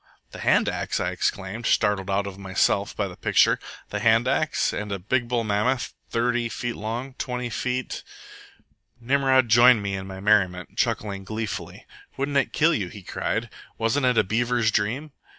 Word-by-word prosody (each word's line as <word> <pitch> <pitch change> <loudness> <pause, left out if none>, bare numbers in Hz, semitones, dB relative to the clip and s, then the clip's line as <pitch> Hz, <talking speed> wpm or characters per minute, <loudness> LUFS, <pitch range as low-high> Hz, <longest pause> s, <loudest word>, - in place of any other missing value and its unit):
"The - - -9
hand - - +3
axe?" - - -2
I - - -1
exclaimed, 100 +4 -2
startled 100 -2 +2
out 100 +1 +1
of 100 -1 -7
myself 100 +1 0
by 100 - -1
the 90 - -9
picture. - - +3 0.3
"The 105 - -2
hand 115 +3 +3
axe, 155 +4 +1
and 105 0 -4
a 100 - -1
big 120 +6 -1
bull 120 -1 0
mammoth, 110 +4 0 0.2
thirty 120 0 0
feet 120 +2 -4
long, 120 +5 -4
twenty 125 -1 -3
feet 125 +3 -3 0.5
" - - -39
Nimrod 130 +1 +3
joined 120 0 +6
me 100 -1 -2
in 95 0 -4
my 95 0 -8
merriment, 95 -3 +1
chuckling 100 -2 -1
gleefully. 110 +1 -5 0.3
"Wouldn't 140 +1 0
it 135 - +1
kill 165 +2 +3
you?" 100 - -1
he 100 +2 -11
cried. - - -2 0.3
"Wasn't 130 +4 +1
it 125 -2 +2
a - - +5
beaver's 115 +2 +1
dream? 115 +9 -1
115 Hz, 175 wpm, -25 LUFS, 100-125 Hz, 0.5 s, joined